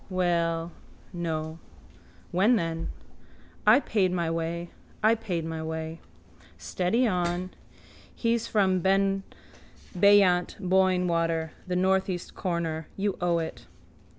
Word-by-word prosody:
Well... 170 -2 0 0.4
No. 160 -2 -3 0.7
When, 200 +8 +4
then? 165 -4 -2 0.8
I 220 +5 +8
paid 195 -9 +1
my 170 -2 -1
way. 165 +1 -3 0.3
I 220 +1 +6
paid 185 -8 -3
my 160 -1 -4
way. 160 0 -5 0.6
Steady 185 - 0
on. 180 -2 -1 0.6
He's 230 -1 0
from 190 -3 +2
beyant 195 0 +1
Boyne 185 -1 +2
water. 165 -1 0 0.2
The 180 - -1
northeast 190 -1 0
corner. 165 -3 -3
You 200 0 0
owe 175 -1 +2
it. 165 -1 -5
180 Hz, 105 wpm, -27 LUFS, 165-195 Hz, 0.8 s, I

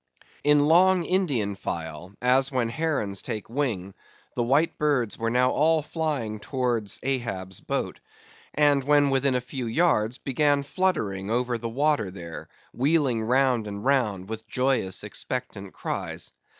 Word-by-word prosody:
In 150 0 +5
long 180 +2 +5
Indian 145 - 0
file, 85 +1 -5
as 130 +2 +3
when 125 -3 0
herons 120 -8 -1
take 110 -2 -5
wing, 115 -9 -2 0.4
the - - -1
white 140 +7 +2
birds 140 -8 +1
were 115 0 -1
now 125 +2 +3
all 155 +1 +3
flying 145 -10 -2
towards 120 -4 -2
Ahab's 115 -8 -2
boat; - - -3 0.6
and 145 -2 +4
when 145 0 +4
within 135 0 +2
a 125 - +1
few 125 0 -5
yards 120 -4 +2
began 145 +1 +1
fluttering 110 - -1
over 120 +1 0
the 115 0 -4
water 140 -3 +1
there, 85 -3 -8 0.2
wheeling 135 -3 +2
round 125 -1 +2
and 100 +2 -6
round, 110 -9 +1
with 110 0 -7
joyous, 125 -7 0
expectant 105 -2 -5
cries. - - -5
125 Hz, 140 wpm, -26 LUFS, 110-145 Hz, 0.6 s, In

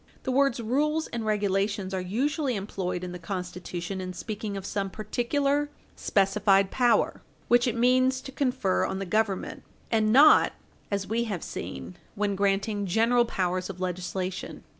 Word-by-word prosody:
The 260 - -1
words 275 -1 +2
"rules 300 +7 0
and 235 -1 -4
regulations" 200 -2 0
are 190 - -1
usually 260 - -1
employed 190 -3 -3
in 180 - -5
the 180 - -7
Constitution 180 0 -5
in 185 0 -5
speaking 205 +2 -5
of 195 - -6
some 200 -1 -2
particular 275 +8 0 0.3
specified 195 -1 +2
power 245 -2 +2 0.3
which 240 +1 +5
it 235 -1 -1
means 255 +2 +3
to 270 - -9
confer 250 - 0
on 190 - -2
the 195 - -3
Government, 205 0 -1 0.3
and 215 -2 +3
not, 285 +6 +7 0.4
as 200 -1 -1
we 230 +3 -1
have 200 -7 -4
seen, 180 - -7 0.2
when 205 -1 0
granting 200 +1 0
general 230 +5 +3
powers 185 -3 -1
of 185 -2 -7
legislation. 185 0 -4
205 Hz, 155 wpm, -27 LUFS, 190-240 Hz, 0.4 s, not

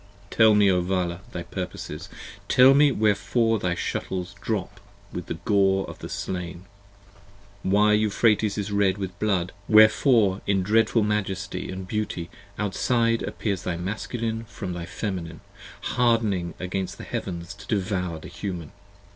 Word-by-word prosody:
Tell 110 -2 +6
me, 105 -1 +5
O 90 -1 +2
Vala, 90 -1 -1
thy - - -5
purposes; - - -6 0.4
tell 130 +2 +7
me 145 +1 +5
wherefore 110 +1 +2
thy 90 -2 -1
shuttles 90 +2 -3
Drop 110 -5 -3 0.3
with - - -5
the - - -3
gore 95 -1 +2
of - - -9
the - - -7
slain; 90 0 -5 1.0
why 105 +2 +3
Euphrates 105 0 +2
is 100 0 -3
red 100 -1 +2
with 95 -2 -4
blood; 95 -4 0 0.2
70 - - -4
Wherefore 110 -2 +5
in 95 -2 +2
dreadful 110 +3 +3
majesty 100 -3 -2
& 95 - -9
beauty 90 -5 -3 0.3
outside 115 +3 +1
appears 100 -5 -2
Thy 90 -3 -3
Masculine 110 +4 -3
from 100 -3 -6
thy 85 -1 -6
Feminine, 85 -6 -5 0.4
hardening 110 -8 +1
against 95 0 -3
the - - -8
heavens 85 +1 -5
To 100 - -14
devour 90 -5 -1
the 80 - -10
Human! 90 -6 -6
100 Hz, 145 wpm, -25 LUFS, 90-110 Hz, 1.0 s, tell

